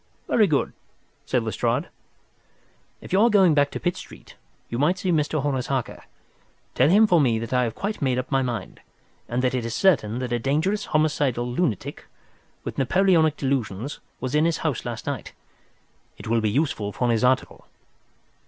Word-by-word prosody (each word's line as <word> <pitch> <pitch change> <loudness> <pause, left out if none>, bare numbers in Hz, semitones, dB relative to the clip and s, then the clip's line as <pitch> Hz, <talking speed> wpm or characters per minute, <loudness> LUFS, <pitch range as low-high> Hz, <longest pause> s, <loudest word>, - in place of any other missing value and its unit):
"Very 215 -3 +4
good," 150 -5 0 0.5
said - - +1
Lestrade. - - -1 1.1
"If - - -9
you 195 - +4
are 235 - +5
going 190 -6 +5
back 145 -1 +3
to - - -6
Pitt 175 - -1
Street, - - -12 0.3
you 120 - -4
might 175 +6 +2
see 185 0 -1
Mr. 150 -2 0
Horace 135 -4 -1
Harker. 135 -3 -3 0.7
Tell - - +3
him 210 +5 +6
for 175 -6 +4
me 120 -5 +2
that 115 +2 -5
I 125 -1 +3
have 115 - -4
quite 210 +2 -4
made 130 -3 +1
up 125 - -4
my 135 - +2
mind, 120 -7 -4 0.5
and 125 +2 -1
that 125 - +1
it 125 -2 -1
is 115 0 -4
certain 120 - +2
that 125 -1 -3
a 120 - 0
dangerous 160 - 0
homicidal 145 -5 +1
lunatic, 125 - -2 0.6
with - - -5
Napoleonic 160 +1 +3
delusions, 130 -2 -2 0.2
was 130 +1 -4
in 150 +1 +3
his 170 -1 +1
house 150 -6 -1
last 120 -2 -5
night. 140 -5 -5 0.8
It - - -11
will 115 +1 +1
be 110 - +1
useful 110 -5 -1
for 120 +3 0
his 115 +1 +1
article." 130 +1 0
135 Hz, 180 wpm, -24 LUFS, 120-160 Hz, 1.1 s, him